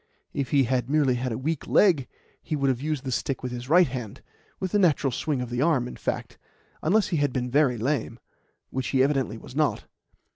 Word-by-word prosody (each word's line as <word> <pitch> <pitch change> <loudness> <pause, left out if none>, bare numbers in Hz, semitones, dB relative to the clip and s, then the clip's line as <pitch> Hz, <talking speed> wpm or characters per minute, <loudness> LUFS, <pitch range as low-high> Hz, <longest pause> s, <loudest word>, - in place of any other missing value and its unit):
If 140 -2 -2
he 140 -2 +4
had 125 0 0
merely 145 -3 +3
had 125 +1 -2
a 110 - -2
weak 155 +3 -3
leg, 165 -11 +4 0.3
he 155 - -3
would 140 -2 +1
have 125 -1 -4
used 150 -2 -2
the 130 - -3
stick 130 +2 -2
with 125 - -3
his 125 +1 -6
right 175 +3 +6
hand 120 -5 -6 0.4
with 185 -2 -3
the 205 - +3
natural 150 -7 +3
swing 135 +2 -1
of 120 - -8
the 120 +1 -1
arm, 140 -6 +2
in - - -8
fact - - -4 0.4
unless 200 +7 +2
he 170 - 0
had 145 -2 +1
been 125 -1 -2
very 135 -3 +3
lame, 125 0 -1 0.5
which 130 -1 -2
he 130 -1 +3
evidently 135 -5 0
was 125 - -12
not. 150 -1 +1
135 Hz, 220 wpm, -26 LUFS, 125-150 Hz, 0.5 s, right